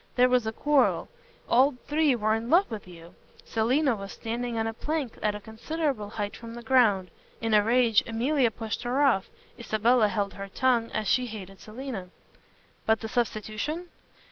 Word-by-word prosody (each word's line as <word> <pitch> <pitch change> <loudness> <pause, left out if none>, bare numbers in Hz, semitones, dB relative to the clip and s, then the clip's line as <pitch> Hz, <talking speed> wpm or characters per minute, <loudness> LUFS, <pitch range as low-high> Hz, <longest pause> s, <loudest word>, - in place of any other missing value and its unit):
There 250 0 +5
was 250 -3 +2
a - - 0
quarrel. 290 +4 +2 0.4
All 260 +3 +4
three 300 -2 +2
were 215 -1 +1
in 225 +2 -2
love 345 -1 +4
with 210 -4 -6
you. 170 -1 -13 0.3
Selina 250 +4 +1
was 195 -1 -7
standing 235 +1 -4
on 225 - 0
a 225 - -2
plank 295 0 -3
at 210 -1 0
a - - -5
considerable 230 +2 -3
height 205 -1 -4
from 230 0 -9
the 240 - -8
ground. 215 -8 +3 0.3
In 225 -1 -1
a 210 - +7
rage 230 -1 +4
Emilia 245 +3 +2
pushed 220 0 -5
her 250 +4 +1
off. 235 -9 +2 0.3
Isabella 230 0 +3
held 205 -1 -2
her 195 0 -7
tongue 235 +2 +1
as 215 -1 -2
she 255 -1 +2
hated 195 -4 -9
Selina." 220 -4 -7 0.8
"But 220 0 +3
the 225 - -5
substitution?" 240 - -2
230 Hz, 175 wpm, -27 LUFS, 215-255 Hz, 0.8 s, a